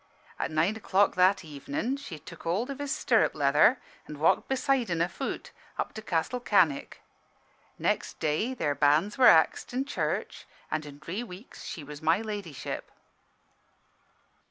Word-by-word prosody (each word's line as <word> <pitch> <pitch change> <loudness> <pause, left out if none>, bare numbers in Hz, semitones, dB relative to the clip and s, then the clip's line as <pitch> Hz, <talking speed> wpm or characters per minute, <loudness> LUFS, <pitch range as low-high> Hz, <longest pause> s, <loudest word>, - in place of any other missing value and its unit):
At - - -1
nine 160 +7 +1
o'clock 205 -2 +2
that 185 0 +3
evenin' 150 - -3
she 275 - -8
tuk - - -12
hold 195 +11 -1
of 275 - -7
his 285 -1 -3
stirrup - - +2
leather - - +4 0.3
an' - - -8
walked - - +3
beside 265 -3 +1
'en, 170 -1 0
afoot, 170 +2 -3 0.3
up - - -3
to 220 - -7
Castle 215 +5 -1
Cannick. 185 - +1 0.7
Next - - -1
day, 185 +13 0
their 145 - 0
banns 150 - +2
were 250 - +8
axed 160 +8 +4
in 265 +2 0
church, 280 - -3 0.2
an' 155 0 -1
in 145 -1 -10
dree 165 +9 -5
weeks 215 0 -10
she 160 - -6
was 145 0 -9
My 165 +4 +3
Ladyship. 205 -9 -5
185 Hz, 155 wpm, -28 LUFS, 155-235 Hz, 0.7 s, were